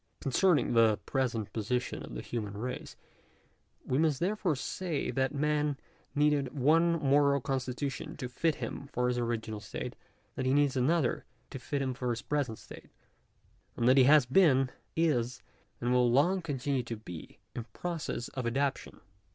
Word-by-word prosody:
Concerning 155 +1 +2
the 115 -2 +5
present 120 -6 -1
position 120 +3 -2
of - - -8
the - - -5
human 105 -4 -4
race, 125 +4 -5 0.9
we 130 - 0
must 155 -4 +2
therefore 190 -3 0
say, 160 +3 -3
that 135 0 0
man 150 0 0 0.4
needed 145 -2 +2
one 165 +5 +4
moral 140 -2 +3
constitution 135 +1 -3
to 125 - -4
fit 155 +5 0
him 140 - -6
for 125 0 +1
his 125 0 0
original 115 -2 -2
state; 105 - -6 0.4
that 130 - -2
he 130 - +3
needs 145 -2 +3
another 135 +1 +1 0.3
to 135 - -6
fit 140 +1 -2
him 130 -1 -1
for 125 -1 -3
his 115 -1 -2
present 140 -7 -1
state; - - -13 0.9
and 120 - +1
that 130 - +6
he 130 -2 +6
has 145 -1 +6
been, 135 -2 +4 0.2
is, 125 -7 0 0.4
and 120 +1 0
will 125 -1 +4
long 175 +9 +3
continue 140 -4 -1
to 115 -1 -6
be, 90 -6 -10 0.2
in 120 - -3
process 165 -4 -4
of 130 -3 -4
adaptation. 135 +3 -2
135 Hz, 160 wpm, -31 LUFS, 120-150 Hz, 0.9 s, that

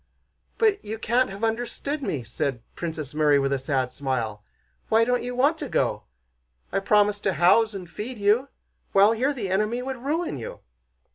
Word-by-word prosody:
"But 430 -3 +2
you 215 +2 -5
can't 240 +3 +1
have 195 +3 -8
understood 245 +6 -2
me," 145 - -2
said 120 +1 -3
Princess 155 -5 -5
Mary 150 -1 +4
with 135 0 +1
a 135 - 0
sad 130 -1 -1
smile. 115 -7 -3 0.5
"Why 225 +1 +5
don't 245 +1 +1
you 245 +1 -4
want 285 +6 +2
to 290 - -4
go? - - 0 0.7
I 195 - +1
promise 205 +1 +3
to 195 -2 0
house 205 +6 +4
and 185 -2 -6
feed 225 +8 -6
you, 210 +6 +3 0.5
while 200 +2 +6
here 250 +5 +1
the 220 -9 -4
enemy 215 +5 0
would 265 0 -4
ruin 290 - -2
you...." 115 - -8
210 Hz, 180 wpm, -25 LUFS, 150-245 Hz, 0.7 s, while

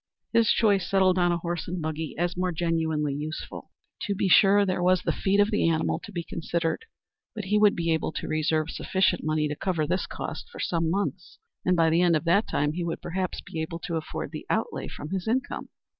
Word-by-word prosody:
His 230 -1 +4
choice 200 -5 +2
settled 190 -1 +3
on 175 0 +3
a 175 - +1
horse 170 0 -4
and 180 +1 -3
buggy 155 -1 -4
as 175 +2 0
more 180 0 0
genuinely 160 -3 0
useful. 150 +2 -6 0.4
To 200 - 0
be 195 - 0
sure 200 +3 +6
there 185 -2 -1
was 180 0 +3
the - - +1
feed 200 +1 +1
of 205 +2 +4
the 210 -5 +2
animal 160 -1 0
to 210 - -11
be 175 -3 -3
considered; 165 - -2 0.5
but 215 - -4
he 210 +2 +2
would 210 -1 +5
be 170 -1 +1
able 160 - -1
to - - -4
reserve 155 0 0
sufficient 190 -2 +1
money 155 0 +1
to 150 - -3
cover 170 -2 -1
this 180 +5 -1
cost - - -6
for - - -11
some 165 -2 0
months, 185 0 -2 0.3
and 180 - +3
by 165 -1 +4
the 165 +2 +4
end 175 -2 +4
of 155 - 0
that 195 +6 +3
time 145 +1 0
he 175 +1 -3
would 170 -1 -3
perhaps 185 +1 -3
be 160 - -5
able 160 +1 -4
to 170 0 -4
afford 160 - -4
the - - -7
outlay - - -1
from 150 - -8
his 190 0 -2
income. 260 +5 -1
175 Hz, 225 wpm, -27 LUFS, 160-190 Hz, 0.5 s, sure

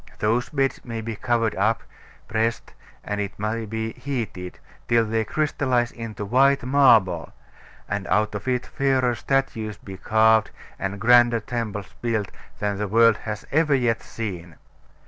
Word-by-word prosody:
Those 115 +3 0
beds 135 -3 -1
may 115 -2 -5
be 110 0 -5
covered 115 -1 0
up, 110 +3 +1 0.4
pressed, 115 +1 -1 0.3
and, 105 0 -3
it 100 - -5
may 110 +2 -2
be, 110 +1 -3
heated, 115 -9 -5 0.3
till 115 -1 +3
they 110 +1 0
crystallise 130 -2 0
into 110 -3 -6
white 135 +5 +3
marble: 115 - +4 0.6
and 100 0 -3
out 105 0 +1
of 105 +4 -6
it 125 -1 0
fairer 130 -3 +1
statues 115 -5 -1
be 95 +1 -10
carved, 110 +2 +3 0.3
and 100 +1 -3
grander 120 +1 +5
temples 105 -6 -5
built, 110 -4 -1 0.3
than 105 -1 -2
the 105 - -1
world 115 +1 +5
has 105 -2 -6
ever 150 -1 +3
yet 120 -4 +1
seen. 90 -7 -6
115 Hz, 145 wpm, -24 LUFS, 105-125 Hz, 0.6 s, grander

